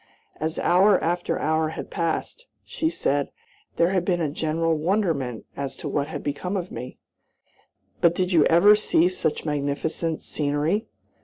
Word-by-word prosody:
As 160 +1 -3
hour 190 +4 +4
after 175 +2 0
hour 155 +1 +1
had 160 - -7
passed, 170 - -3 0.2
she 320 - -2
said, 145 - -1 0.5
there 170 +2 +3
had 185 -2 +1
been 175 -1 0
a 155 -4 -1
general 160 +2 0
wonderment 155 - -1
as 140 -1 -4
to - - -6
what 140 - -1
had - - -6
become 180 +7 -2
of 180 -1 -5
me; 125 +2 -7 1.0
"but 170 0 +4
did 185 0 0
you 165 -4 +5
ever 195 +6 +6
see 180 -5 +3
such 180 -4 -2
magnificent 150 +2 -2
scenery?" 150 +9 -1
165 Hz, 155 wpm, -24 LUFS, 150-180 Hz, 1.0 s, ever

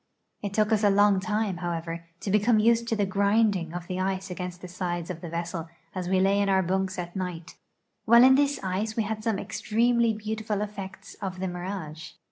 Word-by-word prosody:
It 200 -1 -4
took 215 0 +2
us 215 -1 +2
a 205 - +6
long 200 0 +4
time, 210 -1 -1
however, 170 -1 -4 0.2
to 195 - -2
become 210 +3 +4
used 230 +2 +3
to 225 - +1
the 205 -2 +1
grinding 200 -2 +2
of 175 0 -5
the 185 +1 -4
ice 190 0 -2
against 180 0 -5
the 180 - -7
sides 175 -1 -3
of 170 -2 -8
the 170 - -6
vessel 170 0 -4 0.2
as 180 -2 -3
we 190 0 +3
lay 195 +1 +3
in 200 - +1
our 190 -1 +3
bunks 190 +1 -1
at 175 -1 -5
night. 180 -2 -5 0.5
While 235 +2 +8
in 260 +1 +8
this 285 +1 +2
ice 195 +4 -2
we 225 - +1
had 215 +1 -4
some 220 -3 +1
extremely 235 +3 +1
beautiful 215 -1 -3
effects 200 -2 -8
of 185 -2 -4
the 190 - -1
mirage. 175 -4 -6
195 Hz, 210 wpm, -27 LUFS, 180-215 Hz, 0.5 s, While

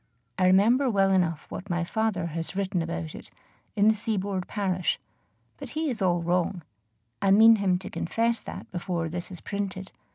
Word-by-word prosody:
I 185 - +4
remember 230 +9 +4
well 195 -3 +3
enough 170 -5 +1
what 200 - -7
my 175 -1 0
father 210 -1 -1
has 165 +2 -4
written 190 -2 -1
about 80 - -4
it - - -10 0.5
in 205 0 +4
"The 220 - +6
Seaboard 200 -3 -2
Parish;" 185 -4 -1 0.6
but - - -8
he 310 -2 -1
is 220 -4 -5
all 175 -2 +2
wrong 175 0 0 0.6
I 195 - +2
mean 220 +3 +7
him 190 -3 +2
to 190 +1 -8
confess 230 +5 0
that - - -9
before 175 -2 -2
this 175 +1 -5
is 180 -3 -10
printed. 195 -2 -4
190 Hz, 175 wpm, -27 LUFS, 175-205 Hz, 0.6 s, mean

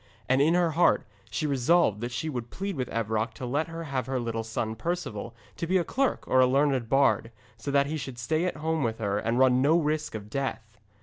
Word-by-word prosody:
And 130 +1 +3
in 160 +4 +4
her 175 -2 +3
heart 170 +3 +3 0.2
she 155 - -2
resolved 140 - +2
that 120 +1 -3
she 120 +7 -3
would 120 -6 -4
plead 195 0 -4
with 130 -3 -3
Evroc 110 0 -1
to 125 - -6
let 145 +6 0
her 165 0 -6
have 135 -5 -3
her 130 -1 -1
little 115 -1 -2
son 110 0 -3
Perceval 115 -6 -4 0.2
to 165 - -3
be 185 +2 +3
a 175 - +2
clerk 270 +9 -1
or 130 - +3
a 130 - +6
learned 135 -3 +2
bard, 135 -3 +3 0.2
so 115 +5 -6
that 140 0 +3
he 155 +3 -3
should 135 -4 -6
stay 155 +8 0
at 180 - -2
home 160 +1 -1
with 115 -3 -1
her 100 -2 -1
and 115 +2 -1
run 130 -1 +4
no 155 +5 +4
risk 155 -4 -1
of 105 -1 -6
death. 110 -3 -4
130 Hz, 235 wpm, -27 LUFS, 115-155 Hz, 0.2 s, a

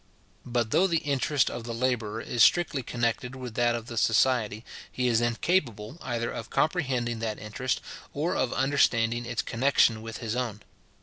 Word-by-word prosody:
But 120 -2 -1
though 190 - +4
the 170 -3 +1
interest 140 -1 +1
of 120 - -6
the 115 0 -5
labourer 115 -3 -1
is 120 - -2
strictly 165 -3 +4
connected 120 +1 -2
with 125 -3 -7
that 120 +1 +2
of 115 -1 -5
the 115 -1 -7
society, 110 -2 +2 0.3
he 125 -1 -1
is 115 -1 +3
incapable 120 - -1
either 120 -2 -2
of 115 - -6
comprehending 130 -8 0
that 110 -1 -3
interest, 120 +4 -3 0.3
or 155 +5 -1
of 130 -2 0
understanding 120 -3 +2
its 120 -1 -2
connexion 115 -2 +2
with 115 +1 -7
his 115 -1 -4
own. 115 -4 -3
120 Hz, 170 wpm, -27 LUFS, 115-130 Hz, 0.3 s, though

